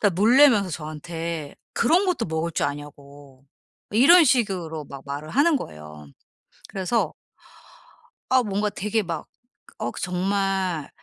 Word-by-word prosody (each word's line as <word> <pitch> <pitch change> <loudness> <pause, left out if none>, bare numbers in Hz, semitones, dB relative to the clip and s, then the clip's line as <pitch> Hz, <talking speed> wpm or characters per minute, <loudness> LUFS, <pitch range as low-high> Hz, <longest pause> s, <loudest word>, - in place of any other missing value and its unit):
다 205 - +5
놀라면서 225 0 +5
저한테 155 0 -5 0.2
그런 340 +11 +3
것도 330 - 0
먹을 160 +1 -2
줄 - - 0
아냐고 140 -2 -10 0.5
이런 310 - +7
식으로 185 - 0
막 140 -1 -10
말을 145 +2 -6
하는 290 +3 +3
거예요. 75 - -9 0.6
그래서 195 +5 -1 1.2
아 260 -1 +4
뭔가 205 0 -1
되게 210 +2 -1
막 165 -3 -5 0.5
어 - - -2
정말 190 -3 -1
180 Hz, 235 characters per minute, -24 LUFS, 150-220 Hz, 1.2 s, 이런